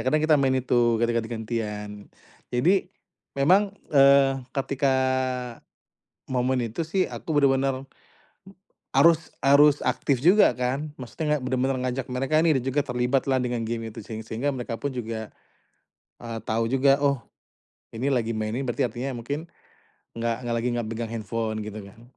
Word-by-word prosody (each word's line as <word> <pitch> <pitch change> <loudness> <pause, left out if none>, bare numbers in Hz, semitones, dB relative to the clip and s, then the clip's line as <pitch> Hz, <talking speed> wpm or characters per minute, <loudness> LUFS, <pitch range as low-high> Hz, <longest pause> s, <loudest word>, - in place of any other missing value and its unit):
kadang 150 +3 +3
kita 155 -1 +5
main 130 -1 +2
itu 120 -2 +2
ketika 115 +1 +1
ganti 110 - -8 0.3
ganti-gantian. 105 -1 -5 0.6
Jadi 175 +10 +2 0.5
memang, 190 +8 +3 0.2
eee, 135 -1 +5 0.2
ketika 135 0 +1 1.3
momen 130 0 0
itu 160 +9 -3
sih 185 +3 0
aku 160 - -6
bener-bener 135 -1 +2 1.1
harus 165 -1 +4 0.2
harus 145 +1 +6
aktif 125 +1 0
juga 190 +5 +6
kan, 135 +5 -2
maksudnya 150 +4 -2
nggak - - -9
bener-bener 130 +1 0
ngajak 125 0 -3
mereka 135 +5 +1
ini 155 -5 +4
juga 135 +3 0
terlibatlah 130 +2 +1
dengan 120 -2 -2
game 115 0 -3
itu - - -8
seng 110 +1 -7
sehingga 115 +6 -2
mereka 120 -2 -4
pun 140 - -1
juga, 110 -2 -5 0.9
eee, 115 -1 -5
tahu 115 +1 0
juga, 135 +1 +3
oh, 140 -3 +2 0.7
ini 130 +5 -2
lagi 115 -2 0
main 110 0 -2
nih, 135 - -2
berarti 120 +1 0
artinya 125 +3 -5
mungkin 145 +8 -5 0.7
nggak 115 0 0
nggak 120 -1 -1
lagi 120 - -1
nggak 120 -2 -2
pegang 115 0 -4
handphone, 110 0 -3
gitu 105 0 -7
kan. 110 +4 -16
130 Hz, 150 wpm, -25 LUFS, 115-140 Hz, 1.3 s, harus